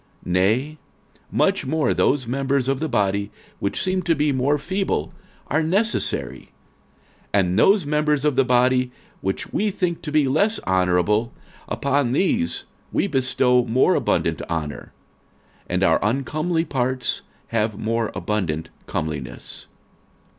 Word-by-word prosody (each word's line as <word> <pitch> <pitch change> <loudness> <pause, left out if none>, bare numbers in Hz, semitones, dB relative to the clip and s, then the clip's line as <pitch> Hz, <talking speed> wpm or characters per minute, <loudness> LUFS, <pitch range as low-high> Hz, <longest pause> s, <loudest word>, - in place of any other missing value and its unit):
46:012:022 - - -4
Nay, 115 +12 +1 0.5
much - - +1
more 155 +2 +1
those 135 -2 +2
members 135 +1 0
of 135 -1 0
the 160 +1 -2
body, 100 -3 0 0.3
which 100 - -2
seem 185 0 +1
to 170 -2 +1
be 150 0 +1
more 135 +2 +2
feeble, 185 - -2 0.3
are 155 - +1
necessary: 160 - -1 0.9
46:012:023 - - +5
And 90 +1 +1
those 195 - +5
members 150 -1 +1
of 150 -3 +2
the 135 - +4
body, 125 0 +2 0.3
which 95 0 -3
we 210 - +1
think 180 -4 -2
to 150 - -5
be 150 -2 +3
less 200 +11 +2
honourable, 95 +5 +2 0.4
upon 140 -3 0
these 235 - +1 0.3
we - - +1
bestow 130 -5 +2
more 125 +2 +3
abundant - - 0
honour; 75 -3 -4 0.8
and - - 0
our - - +4
uncomely 155 - 0
parts 130 -2 -1 0.3
have 110 -2 0
more 115 +1 -1
abundant 85 -7 -2 0.2
comeliness. 75 -4 -5
130 Hz, 135 wpm, -22 LUFS, 105-155 Hz, 0.9 s, 46:012:023